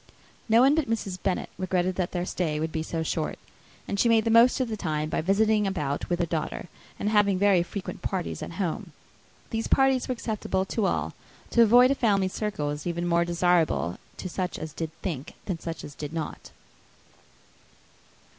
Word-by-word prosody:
No 225 +2 +6
one 270 +3 +6
but 310 -6 0
Mrs. 195 -5 -2
Bennet 190 -2 -1
regretted 185 0 0
that 180 -1 -2
their 175 -1 -2
stay 160 -5 -1
would 160 +1 -2
be 160 - -2
so 160 0 -3
short; 160 0 -2 0.5
and 200 - -2
she 235 - +4
made 225 -1 +4
the 225 - +2
most 235 +3 +6
of 255 - +1
the 225 - -3
time 155 -5 -2
by - - 0
visiting 210 +3 +3
about 150 -7 -2
with 175 - +1
her 175 - +1
daughter, 160 +1 -3 0.3
and - - -3
having 205 -3 +4
very 195 -2 +4
frequent 185 +3 -6
parties 185 -3 -3
at - - -6
home. 175 -2 -3 0.6
These 225 0 -1
parties 270 -2 +3
were 255 - 0
acceptable 210 -5 -2
to 200 +1 0
all; - - -1 0.4
to 235 - +5
avoid 245 +3 +7
a - - +5
family 200 -7 +2
circle 195 -8 -2
was 150 +3 -4
even 170 0 -2
more 170 0 +2
desirable 170 - +1 0.2
to - - -5
such 185 0 -3
as 155 -1 -6
did 160 0 -4
think 150 -7 -4
than 180 -4 -3
such 165 -1 -6
as 145 - -8
did 150 +1 -7
not. 160 -2 -5
185 Hz, 195 wpm, -27 LUFS, 165-215 Hz, 0.6 s, avoid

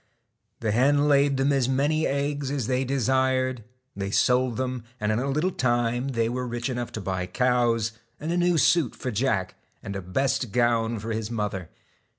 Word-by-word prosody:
The 110 -2 0
hen 145 +6 +3
laid 140 -1 +3
them 135 +2 +2
as 130 -2 +1
many 145 +4 +1
eggs 140 0 -1
as 140 -4 -2
they 130 +2 0
desired; 130 -1 +1 0.3
they 100 0 -3
sold 125 +3 +2
them, 130 -2 -2 0.2
and 105 0 0
in 110 - +1
a 135 +2 -1
little 155 +7 +1
time 120 -2 0
were 125 0 -1
rich 120 +2 -3
enough 120 -1 -4
to 110 - -4
buy 95 -1 -3
cows, 120 0 +1 0.3
and 155 +3 -3
a 175 - 0
new 175 -1 +3
suit 165 -5 +3
for 125 - -4
Jack, 105 -5 0 0.3
and 100 - -5
a 95 - -3
best 125 +5 -1
gown 115 -1 +1
for 110 +2 -5
his 110 -1 -3
mother. 105 -6 -3
125 Hz, 180 wpm, -26 LUFS, 115-135 Hz, 0.3 s, hen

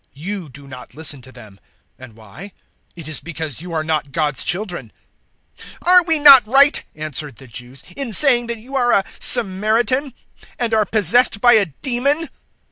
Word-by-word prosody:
You 180 +2 -8
do 140 +1 -13
not 130 -1 -14
listen 150 -3 -2
to 130 - -15
them: 110 -6 -17 0.4
and 130 -4 -15
why? 115 - -14 0.4
It 165 -3 -11
is 155 - -1
because 160 -4 -7
you 175 0 -11
are 160 -1 -3
not 155 -3 -4
God's 150 -2 -3
children." 175 - -3 0.7
008:048 - - -12 0.2
"Are 360 0 +4
we 325 -2 +2
not 275 -6 +7
right," 275 +5 +4
answered 150 -3 -4
the 135 - -16
Jews, 125 +3 -9
"in 275 -4 -4
saying 240 +1 +4
that 235 0 -2
you 250 +5 -12
are 245 -2 0
a 195 - +1
Samaritan 235 +5 +1 0.4
and 235 -2 -3
are 215 -1 +1
possessed 220 +3 +2
by 240 +3 +4
a 210 -4 +3
demon?" 270 - 0
190 Hz, 175 wpm, -17 LUFS, 145-245 Hz, 0.7 s, not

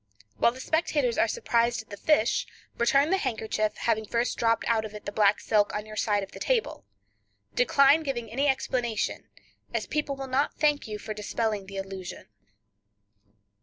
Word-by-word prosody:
While 235 - +4
the 255 - -11
spectators 290 -4 0
are - - +4
surprised 235 +1 0
at 220 - -25
the - - -5
fish, 235 0 +2 0.3
return 275 +6 +3
the 385 - +3
handkerchief, 215 - -1
having 220 -2 0
first 235 +3 0
dropped 230 -1 +1
out 225 -2 +2
of 215 -1 -7
it 210 - -9
the - - -3
black 205 -1 +3
silk 210 -2 +1
on 210 0 -3
your 215 0 -9
side 205 -1 +1
of 195 - -9
the - - -10
table. - - -1 0.7
Decline 285 - +5
giving 260 -6 -3
any 275 +5 +1
explanation, 245 -4 -1 0.5
as - - 0
people 295 -2 -2
will 270 0 -5
not 265 +2 0
thank 295 -3 +2
your 210 -1 -4
for 215 +1 -6
dispelling 210 -1 -2
the 195 0 -8
illusion. 195 -1 -7
230 Hz, 175 wpm, -27 LUFS, 210-275 Hz, 0.7 s, Decline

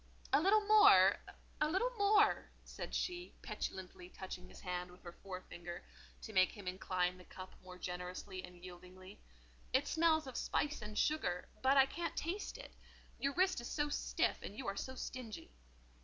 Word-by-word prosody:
"A - - +6
little 415 +4 +4
more—a 415 -7 +5
little 390 +9 +1
more," 415 -2 +4
said - - -6
she, 355 0 -3
petulantly 180 -1 -5
touching 185 -1 -8
his - - -13
hand 180 -1 -3
with 180 - -17
the 175 - -7
forefinger, 175 -2 -8 0.4
to 220 - -7
make 185 -1 +5
him 205 -3 -10
incline 180 -1 -1
the - - -12
cup 185 +1 -10
more 180 0 -10
generously 180 +1 -5
and 180 0 -10
yieldingly. 185 +2 -11 0.5
"It 265 +3 +3
smells 320 -2 +3
of 260 -2 -6
spice 295 -2 0
and 210 0 -6
sugar, 180 - 0
but 270 +1 +4
I 270 - +8
can't 335 +5 -4
taste 360 +6 -3
it; - - -10 0.5
your 280 0 0
wrist 370 -5 +2
is 240 - -6
so 295 -1 0
stiff, - - 0
and 205 - -7
you 265 - -5
are 195 - -2
so 260 +6 -4
stingy." 250 - -6
215 Hz, 170 wpm, -37 LUFS, -, 0.5 s, I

